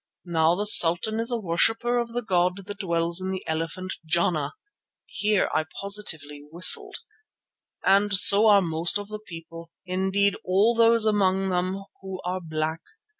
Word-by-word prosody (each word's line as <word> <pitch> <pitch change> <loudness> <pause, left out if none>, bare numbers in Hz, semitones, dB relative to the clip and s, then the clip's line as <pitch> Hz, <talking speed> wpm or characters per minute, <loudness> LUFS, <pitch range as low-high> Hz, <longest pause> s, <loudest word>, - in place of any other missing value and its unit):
Now 165 -1 +1
the 205 +3 -4
sultan 205 +2 +4
is 230 +1 -1
a 240 - -1
worshipper 225 +6 0
of 235 -1 -5
the 245 0 -4
god 180 -1 -1
that 205 0 -9
dwells 170 -1 -1
in 185 - -5
the 190 -1 -6
elephant 165 +4 -5
Jana" 155 -2 -2 0.5
(here 210 -1 -1
I 155 - -1
positively 160 -8 -1
whistled) 170 +3 +1 0.9
"and 200 +2 +2
so 200 +3 +7
are 200 -2 +4
most 170 +3 0
of 205 0 -9
the 215 0 -7
people, 165 -3 -12 0.2
indeed 190 +2 -1
all 195 +5 +1
those 230 -1 +2
among 195 -2 0
them 185 +2 -3 0.2
who 190 -1 -8
are 185 +1 -4
black. 160 0 -5
185 Hz, 155 wpm, -24 LUFS, 170-205 Hz, 0.9 s, so